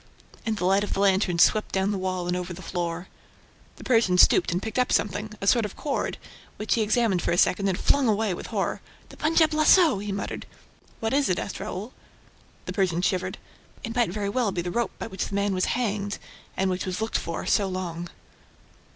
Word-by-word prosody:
And 220 -1 0
the 180 - -2
light 195 +2 +3
of 205 - -3
the - - -2
lantern 190 -2 +2
swept 215 +5 +3
down 190 +1 +1
the 205 - -1
wall 185 -1 -2
and 180 - 0
over 180 0 -4
the 185 +2 -10
floor. 175 0 -3 0.7
The - - -12
Persian 225 -7 +3
stooped - - +5
and 175 - 0
picked 220 +4 -3
up 250 - +2
something, 210 +1 0
a - - -4
sort 235 +3 +4
of 210 - -5
cord, 285 -2 -2 0.4
which 215 - 0
he 230 - +1
examined 215 -3 +2
for - - -1
a 170 - +1
second 195 +2 +3
and 185 - 0
flung 280 -3 +3
away 215 -2 +1
with - - -7
horror. - - -2 0.3
"The - - -13
Punjab 315 0 +3
lasso!" 310 - +5
he 205 0 -4
muttered. 200 0 -4 0.5
"What 225 +2 -1
is 280 0 +2
it?" 180 - +1
asked 200 - -4
Raoul. 210 +3 -5 0.7
The 185 - -4
Persian 180 -3 0
shivered. 185 -1 0 0.5
"It 230 -1 -5
might 240 -4 +2
very 200 +2 -3
well 225 -1 0
be 175 -2 -2
the 175 - -3
rope 235 +4 -1
by - - -5
which 190 -4 -3
the 200 - -5
man 200 0 +1
was 185 0 +1
hanged, 205 -4 -2 0.4
and 190 0 +1
which 185 +1 -3
was 185 +2 -3
looked 220 +1 -1
for 165 - -5
so 200 - +2
long." 175 -2 -4
200 Hz, 220 wpm, -26 LUFS, 185-220 Hz, 0.7 s, stooped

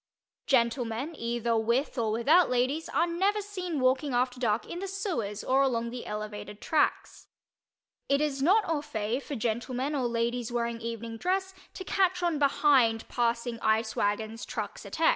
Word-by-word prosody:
Gentlemen, 240 +3 +1
either 235 -1 -1
with 235 +5 +1
or 225 -4 0
without 295 +11 +4
ladies, 255 +6 0
are - - +2
never 380 +5 +1
seen 370 -6 -4
walking 260 +1 +2
after 250 0 0
dark 225 -3 +1
in 345 - -5
the 390 - -4
sewers 330 - -3
or 265 +1 +3
along 235 -3 0
the 245 0 -7
elevated, 210 -1 -6
tracks. 310 +5 0 0.8
It 280 0 +3
is 290 -2 -1
not 390 +7 +4
au 320 -3 0
fait 235 -3 -2
for 285 - -6
gentlemen 245 +4 -2
or 260 -4 0
ladies 235 0 -1
wearing 235 -1 -2
evening 230 0 -5
dress 380 - -1 0.2
to 375 - -6
"catch 370 -1 +1
on 335 -4 +1
behind" 270 -5 +3
passing 235 0 -1
ice 220 0 +1
wagons, 215 +2 -1
trucks, - - -5
etc. - - +2
250 Hz, 160 wpm, -29 LUFS, 230-300 Hz, 0.8 s, without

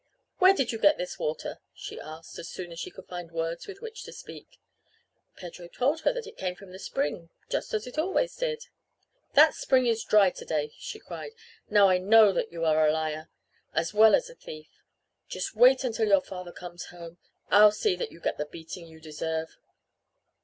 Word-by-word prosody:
"Where 380 +1 +7
did 265 -9 0
you 225 - -4
get 300 +6 +5
this 180 0 -5
water?" 150 - -3 0.2
she - - -8
asked, 160 +1 -10
as 165 - -7
soon 175 -2 -7
as 165 - -8
she - - -5
could 190 - -13
find 175 -2 -8
words 165 0 -3
with 395 -1 -9
which 450 -1 -8
to - - -9
speak. - - -12 0.8
Pedro 175 -1 -10
told 270 - 0
her - - +2
that - - -5
it 440 +1 -12
came 180 -1 -2
from 190 0 -14
the 185 - -10
spring 165 -1 -3 0.2
just - - -2
as 215 - -2
it 250 +4 -5
always 385 +9 0
did. 475 -2 -2 0.7
"That 305 +2 +8
spring 255 -2 +2
is 230 -2 +1
dry 200 -3 +5
to - - -10
day!" 150 -1 -2
she - - -6
cried. 450 - -8 0.4
"Now 205 -1 +6
I 185 -1 +3
know 210 +2 +6
that - - -2
you 165 -1 -3
are 155 -1 +4
a - - +4
liar 155 0 -3 0.5
as 165 +3 0
well 220 +1 +7
as - - -1
a - - -12
thief. 155 - -11 0.6
Just - - -4
wait 255 +3 +6
until 225 -3 0
your 195 -2 +5
father 180 -2 -8
comes 175 0 -9
home! 170 -1 -11 0.3
I'll 210 +2 +8
see 210 -3 0
that - - -4
you - - -14
get - - -2
the 150 - -2
beating 165 +2 -9
you 160 -1 -15
deserve." 160 +1 -4
185 Hz, 205 wpm, -28 LUFS, 165-245 Hz, 0.8 s, That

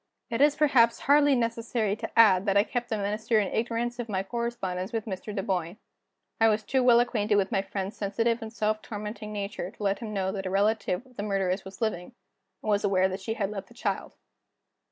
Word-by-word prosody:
It 230 +3 0
is 295 0 +5
perhaps 250 -6 +4
hardly 285 0 +5
necessary 230 -3 -1
to - - -5
add 205 -3 +6
that 200 0 +3
I 200 - +6
kept 240 +1 -3
the 220 - -1
Minister 215 +2 0
in 200 - 0
ignorance 235 +1 -1
of 235 -2 -4
my 190 -2 -1
correspondence 215 -4 -3
with 225 -2 -2
Mr. 190 -4 -6
Dunboyne. 185 -2 -2 0.6
I 225 - +6
was 215 0 +2
too 265 +4 +1
well 245 -2 +6
acquainted 220 -3 +1
with 200 -1 +1
my 195 - +2
friend's 195 0 -5
sensitive 230 +4 0
and 220 -1 -6
self 215 -1 -1
tormenting 210 0 -6
nature 200 -3 -4
to 215 0 -10
let 195 0 +1
him 225 -3 -6
know 190 -2 -1
that 195 -1 -4
a - - -2
relative 205 +2 +1
of 255 -2 -22
the - - -2
murderess 195 -2 -1
was 190 +4 -11
living, 220 0 -2 0.5
and - - -3
was 205 0 +2
aware 190 -2 +3
that 190 +1 -5
she 220 +3 -3
had 200 -2 -2
left 195 -2 -6
a 235 - -17
child. - - -3
215 Hz, 215 wpm, -27 LUFS, 195-230 Hz, 0.6 s, add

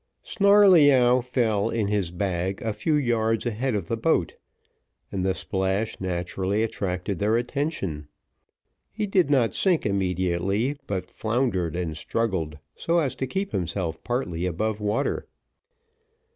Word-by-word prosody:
Snarleyyow 155 - +5
fell 115 -5 0
in 110 -3 -1
his 100 -4 0
bag 90 +1 -2
a 110 -1 -1
few 150 +9 0
yards 115 -5 +1
ahead 120 +1 -1
of 95 -5 -3
the - - -1
boat, 115 - +1 0.8
and 95 - -2
the 95 0 +1
splash 95 +3 -2
naturally 95 +3 -1
attracted 95 -3 -3
their 110 +3 +2
attention; 120 - -3 0.8
he 215 -1 -2
did 190 -6 +2
not 130 -6 +3
sink 180 -4 +2
immediately, 95 - 0
but 95 -2 -4
floundered 110 - -1
and 85 -3 -3
struggled 85 -4 -2 0.2
so 170 +1 0
as 150 -6 +1
to 130 - -3
keep 195 +8 -3
himself 85 -2 -3
partly 90 -9 -2
above 105 +5 -2
water. 105 +7 -1
105 Hz, 130 wpm, -25 LUFS, 95-125 Hz, 0.8 s, Snarleyyow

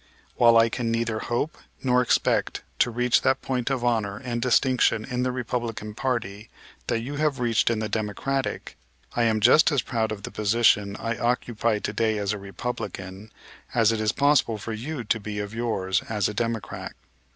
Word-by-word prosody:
While 115 -1 +6
I 115 0 +6
can 115 0 -2
neither 115 -1 -1
hope 120 +8 -2 0.2
nor 125 -1 +3
expect 125 - +1 0.2
to - - +4
reach 120 +1 +2
that 130 - +1
point 125 -1 -1
of 130 -3 -1
honor 110 -4 0
and 120 -1 -4
distinction 125 -2 +2
in 125 -1 -2
the 125 0 0
Republican 115 -4 -4
party 110 -4 -3 0.4
that 115 -1 0
you 140 +5 -5
have 150 -3 0
reached 115 -2 +2
in 115 - 0
the 110 0 -2
Democratic, 110 +6 -3 0.4
I 120 - +2
am 110 -1 +2
just 150 +9 +6
as 140 -4 +1
proud 110 -3 -1
of 100 -2 -6
the - - -6
position 105 -2 +2
I 115 0 -3
occupy 120 -2 0
to 105 - -4
day 110 0 +1
as 100 0 -1
a 105 - -5
Republican, 100 -1 -6 0.4
as 115 -2 +4
it 110 -1 -1
is 105 -1 +2
possible 140 -6 +2
for 110 +2 -5
you 125 +4 -5
to 115 +1 0
be 105 0 -6
of 105 0 -4
yours 105 -5 -1
as 105 -3 +1
a 105 - -4
Democrat. 115 -3 -3
115 Hz, 185 wpm, -25 LUFS, 105-125 Hz, 0.4 s, While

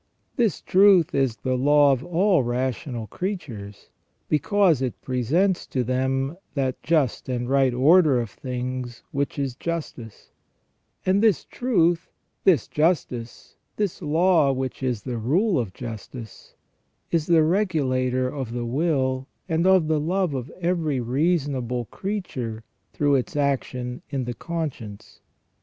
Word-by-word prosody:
This 230 - +1
truth 190 -4 +5
is 135 -4 +1
the 130 +2 -2
law 145 +2 +5
of 130 -1 0
all 175 0 +2
rational 125 -1 -2
creatures, 120 - -6 0.4
because 170 - +3
it 130 -3 -3
presents 155 - +1
to 130 - -1
them 135 +4 -1 0.2
that 130 -2 -1
just 150 -7 0
and 120 -1 -2
right 135 -1 +3
order 145 +2 +5
of 115 -4 -4
things 125 -1 -5
which 140 +1 -2
is 135 -3 -1
justice; 140 -9 -6 0.7
and 190 +2 +3
this 215 -9 +3
truth, 175 -9 +1 0.4
this 185 -6 +4
justice, 150 -7 -1 0.2
this 205 -4 -2
law 160 -1 +3
which 130 0 -3
is 125 -5 -2
the 125 -3 -4
rule 170 - +2
of 110 -6 -3
justice, 115 0 -9 0.6
is 165 -3 +1
the 165 -2 +5
regulator 135 -9 +1
of 130 -3 -5
the 120 -1 -3
will 130 -1 0 0.2
and 165 +1 +1
of 190 -4 +5
the 155 -1 +2
love 180 +1 0
of 130 0 -4
every 170 -6 0
reasonable 130 -2 0
creature 130 - -5 0.3
through 145 -1 +1
its 130 0 0
action 130 -3 -1
in 135 -3 -2
the 120 - -3
conscience. 135 -10 -6
140 Hz, 135 wpm, -24 LUFS, 125-170 Hz, 0.7 s, truth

